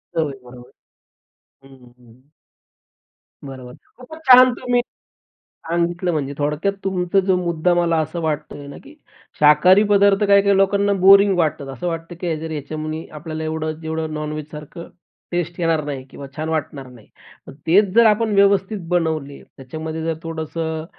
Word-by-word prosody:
चव 160 -3 0
बरोबर. 125 0 -14 0.9
हं, 135 0 -16 0.2
हं. 125 +4 -22 1.1
बरोबर. 130 -2 -10 0.2
खूपचं 255 +5 -12
छान 255 0 +8
तुम्ही 245 0 0 0.7
सांगितलं, 170 +1 -3
म्हणजे 140 -2 -3
थोडक्यात 150 +7 -1
तुमचा 190 0 +1
जो 190 -2 +3
मुद्दा 175 -1 0
मला 170 -1 +1
असं 155 +2 -4
वाटतोय 150 -2 -4
ना, 140 - -10
की 295 +2 -15 0.5
शाकाहारी 180 +7 +6
पदार्थ 200 0 +4
काही-काही 200 0 +4
लोकांना 200 +1 +2
बोरिंग 195 0 +6
वाटतात. 155 -4 -1
असं 135 +6 -6
वाटतं 165 0 -5
की 170 -3 -2
जर 160 0 -6
याच्यामध्ये 155 +1 -5
आपल्याला 155 +1 -6
एवढं 155 0 -3
जेवढं 160 -1 -4
नॉन-व्हेज 150 0 -5
सारखं 150 +3 -10 0.4
टेस्ट 175 0 -3
येणार 165 -2 +1
नाही 140 -3 -5
किंवा 140 - -10
छान 155 +1 -4
वाटणार 150 -4 -4
नाही. 120 -4 -17 0.4
मग - - -11
तेच 190 +3 +3
जर 235 0 +6
आपण 220 0 +2
व्यवस्थित 200 +1 +2
बनवले, 160 -5 -2
त्याच्यामध्ये 160 +4 -6
जर 165 0 -1
थोडंसं 160 0 -4
160 Hz, 145 wpm, -20 LUFS, 150-190 Hz, 1.1 s, छान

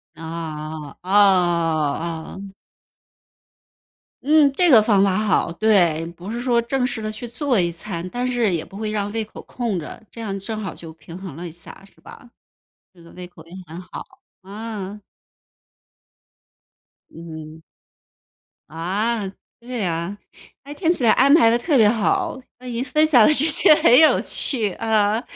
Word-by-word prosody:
啊 155 -2 -7
啊， 185 - -8
啊！ 170 -5 +1
哦。 195 0 -10 1.7
嗯！ 300 0 +5
这 355 +5 +2
个 225 - +8
方 205 -2 +2
法 190 -2 +1
好， 210 -4 0
对。 170 -5 +2
不 180 +5 -9
是 235 - -4
说 240 -1 +1
正 250 +2 -1
式 245 -3 -5
地 215 0 -4
去 215 +3 -7
做 250 0 -1
一 175 -1 +1
餐， 170 +1 -6
但 245 +5 -4
是 240 -6 0
也 165 -2 -2
不 195 - -13
会 215 0 -4
让 205 -1 -3
胃 225 +1 -2
口 215 - -12
空 235 -6 -4
着， 160 - -8
这 230 - -11
样 200 -3 -4
正 215 +3 -6
好 190 - -5
就 165 -1 -10
平 165 +1 -12
衡 185 -6 -9
了 170 +3 -8
一 170 - -7
下， 175 +3 -11
是 195 - -22
吧？ 245 - -15 0.6
这 175 - -20
个 170 - -16
胃 180 0 -10
口 170 -2 -17
也 170 - -16
很 165 +3 -9
好。 180 -1 -10 0.4
嗯。 205 0 -7 2.1
嗯。 160 -1 -11 1.1
啊， 195 +7 -2 0.3
对 240 -2 -5
啊， 170 +3 -3 0.5
诶， 285 - -9
听 330 +2 0
起 310 - -1
来 225 - +5
安 275 +2 +4
排 300 -8 +6
得 235 - +2
特 275 +3 0
别 220 - +5
好！ 220 +4 0 0.2
那 255 - -15
您 240 0 -3
分 305 +4 +1
享 250 -8 +5
的 305 - +4
这 300 0 +6
些 310 -1 +6
很 245 -3 +5
有 315 - +5
趣， 225 -7 +2
呃， 220 0 0
205 Hz, 180 characters per minute, -21 LUFS, 170-235 Hz, 2.1 s, 个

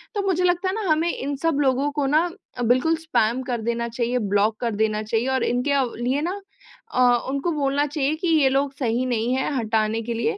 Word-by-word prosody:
तो 410 - +1
मुझे 365 -1 +1
लगता 360 +1 +1
है 380 - -2
ना 445 - -3
हमें 320 +2 +2
इन 280 +1 -3
सब 325 -3 +1
लोगों 275 +1 +1
को 290 -1 -1
ना 315 +5 +2 0.3
अ, - - -3
बिल्कुल 255 +8 +3
स्पैम 260 -7 0
कर 245 -2 -3
देना 235 +1 -2
चाहिए, 240 +1 -1
ब्लॉक 205 +1 +1
कर 230 -3 -1
देना 215 0 0
चाहिए, 225 +3 -1
और 265 0 +1
इनके 250 +4 0
अव 265 -4 +1
लिए 255 +5 0
ना 370 +5 -3 0.5
अ, 255 - +3 0.3
उनको 280 +5 -1
बोलना 285 -1 +1
चाहिए 290 0 -1
कि 340 +3 -3
ये 305 -5 +4
लोग 275 +1 0
सही 245 -1 0
नहीं 240 -1 0
है, 265 +2 -1
हटाने 220 -1 0
के 235 +1 -3
लिए। 230 +9 -1
265 Hz, 225 wpm, -23 LUFS, 235-300 Hz, 0.5 s, ये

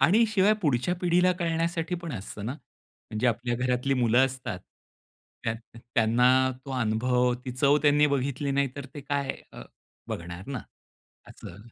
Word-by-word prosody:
आणि 215 +7 +5
शिवाय 205 0 +4
पुढच्या 145 +4 +1
पिढीला 180 +1 +3
कळण्यासाठी 170 0 -1
पण 165 -4 -5
असतं 100 -1 -6
ना. 125 - -2 0.6
म्हणजे 110 +3 0
आपल्या 120 +1 0
घरातली 125 +2 0
मुलं 120 +1 +4
असतात, 125 -7 -5 0.9
त्या 115 - 0 0.4
त्यांना 115 +2 +4 0.4
तो 140 - -8
अनुभव, 125 +3 +2
ती 125 - -4
चव 140 +3 +3
त्यांनी 150 0 +5
बघितली 140 0 -1
नाही 140 0 +1
तर 140 -1 -6
ते 145 - -6
काय 140 0 -1 0.2
अ, - - -9 0.5
बघणार 85 +1 -6
ना 140 -3 -4 0.7
असं, 85 - -11
135 Hz, 150 wpm, -27 LUFS, 120-150 Hz, 0.9 s, आणि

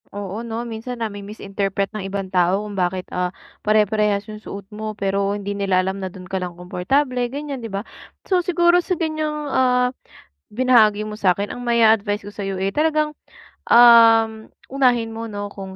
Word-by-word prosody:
Oo 205 +2 -5
'no, 235 +1 -5
minsan 235 +2 -6
nami-misinterpret 200 -2 -3
ng 210 - -4
ibang 195 0 -4
tao 185 +2 +1
kung 205 - -7
bakit, 185 0 -1
ah, 180 0 -1 0.3
pare-parehas 210 -1 +2
yung 215 0 -9
suot 200 -1 -8
mo, 215 +1 -6
pero 200 -1 -1
hindi 200 0 -4
nila 195 -2 +1
alam 190 +1 -2
na 190 - -4
dun 185 0 -11
ka 190 - -5
lang 180 -2 -4
komportable 250 +9 0
ganyan, 280 -2 -5
'di 225 - -6
ba. 195 +3 -4 0.4
So 365 -2 +2
siguro 345 0 +3
sa 365 -2 -2
ganyang, 310 -2 -2
ah, 250 -2 +2 0.6
binahagi 215 -3 +3
mo 210 - -6
sa'kin 200 -1 +1
ang 245 - -7
mai-a-advice 220 -3 +3
ko - - -7
sa'yo 195 -2 -4
eh 195 +1 0
talagang, 305 0 +1 0.6
um, 225 -2 +6 0.2
unahin 245 -4 +2
mo 230 0 -5
'no 205 0 -4
kung 190 -1 -9
215 Hz, 170 wpm, -21 LUFS, 195-245 Hz, 0.6 s, um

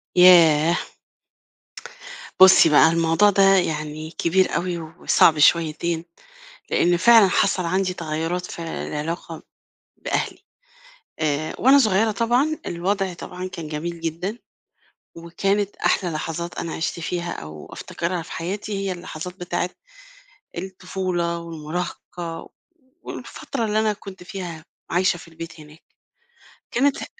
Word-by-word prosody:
ياه! 170 -2 +7 1.6
بُصّي 190 -3 +9
بقى 155 +2 +6
الموضوع 165 +5 +3
ده 195 -1 +3
يعني 155 -3 -2
كبير 185 +3 +1
أوي 175 0 -1
وصعب 160 -1 +2
شويتين، 165 +1 +2 0.7
لإن 175 0 +3
فعلًا 225 +2 +7
حصل 185 -1 +1
عندي 185 +2 0
تغيُّرات 165 +2 -3
في - - -9
العلاقة 165 0 -5 0.5
بأهلي، - - -2 0.8
آآ 155 0 -1
وأنا 270 +3 +6
صغيّرة 215 -2 +3
طبعًا، 245 +8 +1
الوضع 190 +2 -1
طبعًا 180 +1 -7
كان 170 -4 -7
جميل 165 +3 -5
جدًا، 170 +7 -4 0.8
وكانت 195 +4 -1
أحلى 180 -3 +1
لحظات 165 +2 -4
أنا 165 - -4
عِشت 170 +1 -3
فيها 170 +1 -3
أو 75 0 -9
أفتكرها 170 0 -4
في 165 - -11
حياتي 200 +5 -4
هي 190 - -1
اللحظات 175 0 -7
بتاعة 175 0 -2 0.9
الطفولة 185 -2 -3
والمراهقة 165 +1 -6
و - - -15 0.5
والفترة 250 -4 -5
اللي 215 0 +1
أنا 215 -1 +2
كنت 195 -2 -11
فيها 180 -4 -7 0.3
عايشة 180 +1 +2
في 165 - -13
البيت 165 0 -10
هناك، 150 +1 -15 0.9
كانت 275 +3 +1
ه - - -4
175 Hz, 120 wpm, -22 LUFS, 165-190 Hz, 1.6 s, بُصّي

